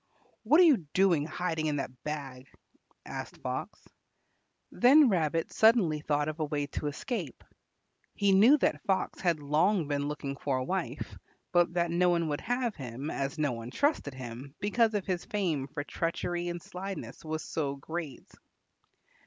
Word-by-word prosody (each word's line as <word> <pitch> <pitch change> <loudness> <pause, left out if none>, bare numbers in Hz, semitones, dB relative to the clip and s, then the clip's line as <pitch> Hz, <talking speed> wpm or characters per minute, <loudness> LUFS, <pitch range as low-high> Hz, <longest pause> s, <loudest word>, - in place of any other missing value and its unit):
"What 285 +9 +4
are - - +9
you 310 -7 +6 0.2
doing, 175 -6 +3
hiding 160 -1 -2
in 150 - 0
the 140 - -2 0.2
bag?" 135 -4 -5 0.6
asked - - -7
Fox. - - -5 0.8
Then 270 +3 +6
Rabbit 165 -4 0
suddenly 220 -9 +4
thought 145 0 0
of 155 +1 -4
a 155 - +1
way 145 -1 -2
of 145 - -5
escape. 160 - -4 0.7
He 200 -1 +3
knew 220 +10 +7
that - - 0
Fox 190 -1 0
had 170 -4 +1
long 155 +5 +2
been 145 -1 -1
looking 140 -2 -4
for 135 -2 -1
a 130 - -1
wife, 190 +8 -4 0.3
but 175 -1 +3
that 170 -1 +1
no 180 +1 +3
one 170 -2 +1
would 145 - -2
have 245 -1 -1
him 135 +2 -5
as 140 +2 -3
no 150 -3 +1
one 115 0 -6
trusted 145 - 0
him 130 +2 -8
because 220 +2 +2
his 180 -2 -2
fame 165 -10 -1
for 145 +1 -5
treachery 175 +2 -2
and 175 -1 -4
slyness 190 +1 -7
was 155 0 -3
so 140 -3 -2
great. 155 0 -6
160 Hz, 160 wpm, -30 LUFS, 145-190 Hz, 0.8 s, are